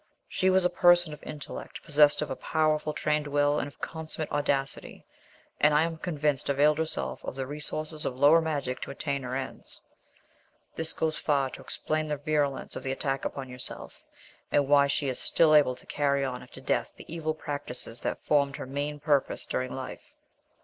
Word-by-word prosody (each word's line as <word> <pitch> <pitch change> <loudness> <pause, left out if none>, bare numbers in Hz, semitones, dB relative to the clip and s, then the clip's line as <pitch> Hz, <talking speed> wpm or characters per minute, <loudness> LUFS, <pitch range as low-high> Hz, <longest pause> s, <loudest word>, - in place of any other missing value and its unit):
She 190 - +1
was 185 -1 +4
a - - +5
person 175 -2 +5
of 150 - -10
intellect, 150 -2 -8
possessed 150 -1 +4
of 150 - -6
a - - -1
powerful, 155 0 +1
trained 150 0 0
will, 145 0 +2
and - - -2
of 145 - -14
consummate 160 -1 -5
audacity, 140 -2 -1 0.5
and 150 0 +5
I 150 - +5
am 165 0 -2
convinced 150 -6 -1
availed 150 +2 +4
herself 160 0 -2
of - - -5
the 135 -1 -3
resources 150 +2 -3
of 125 - -2
the - - -13
lower 150 +4 +7
magic 145 -5 -2
to - - -5
attain 140 0 -2
her 125 0 -4
ends. 135 0 -6 1.0
This 160 0 -1
goes 160 -1 -1
far 140 -3 +1
to - - -9
explain 155 0 -2
the 150 -1 -1
virulence 145 -1 -1
of - - -4
the 135 - -2
attack 135 0 -1
upon 135 -1 -4
yourself, 125 0 -8 0.5
and 145 -1 +3
why 140 0 +6
she 140 0 0
is 130 - -2
still 160 -2 +4
able 145 -4 +5
to - - -15
carry 140 -1 +1
on 125 -2 -4
after 130 +1 -12
death 135 - -1
the - - -12
evil 155 -1 -2
practices 125 -6 -5
that - - -3
formed 140 -2 +3
her - - -6
main 145 +2 -3
purpose 145 -2 +1
during 130 0 -2
life." 130 -1 -7
145 Hz, 190 wpm, -28 LUFS, 135-155 Hz, 1.0 s, lower